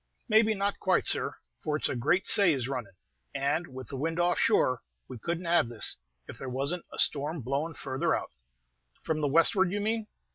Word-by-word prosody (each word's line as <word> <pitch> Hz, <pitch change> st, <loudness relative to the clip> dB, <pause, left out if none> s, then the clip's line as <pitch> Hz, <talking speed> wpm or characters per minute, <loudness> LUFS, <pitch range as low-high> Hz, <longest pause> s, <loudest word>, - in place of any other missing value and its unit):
"Maybe 220 Hz, -1 st, +4 dB
not 200 Hz, 0 st, -1 dB
quite, 185 Hz, -, +2 dB
sir, -, -, +1 dB, 0.3 s
for 150 Hz, -, -1 dB
it's 150 Hz, -, 0 dB
a -, -, -3 dB
great 145 Hz, +10 st, +1 dB
say 195 Hz, -6 st, +6 dB
is 130 Hz, -3 st, -2 dB
runnin'; 120 Hz, -8 st, -5 dB, 0.4 s
and, 145 Hz, +5 st, 0 dB
with 130 Hz, -2 st, -9 dB
the 140 Hz, -, -5 dB
wind 165 Hz, +5 st, -2 dB
off 175 Hz, 0 st, +2 dB
shore, 130 Hz, -, +3 dB, 0.3 s
we 125 Hz, -, -9 dB
could 170 Hz, +9 st, -2 dB
n't 180 Hz, -, -9 dB
have 170 Hz, -8 st, +3 dB
this, 115 Hz, -3 st, 0 dB, 0.3 s
if -, -, -10 dB
there 130 Hz, -, -5 dB
was 135 Hz, +5 st, -1 dB
n't 180 Hz, -, -5 dB
a -, -, -9 dB
storm 150 Hz, +2 st, +1 dB
blowing 145 Hz, +6 st, -2 dB
farther 135 Hz, -1 st, -1 dB
out." -, -, -5 dB, 0.7 s
"From 155 Hz, -1 st, -1 dB
the 145 Hz, -, +1 dB
westward, 170 Hz, +5 st, +3 dB
you 205 Hz, -, -1 dB
mean?" 220 Hz, +1 st, -1 dB
155 Hz, 210 wpm, -29 LUFS, 130-180 Hz, 0.7 s, say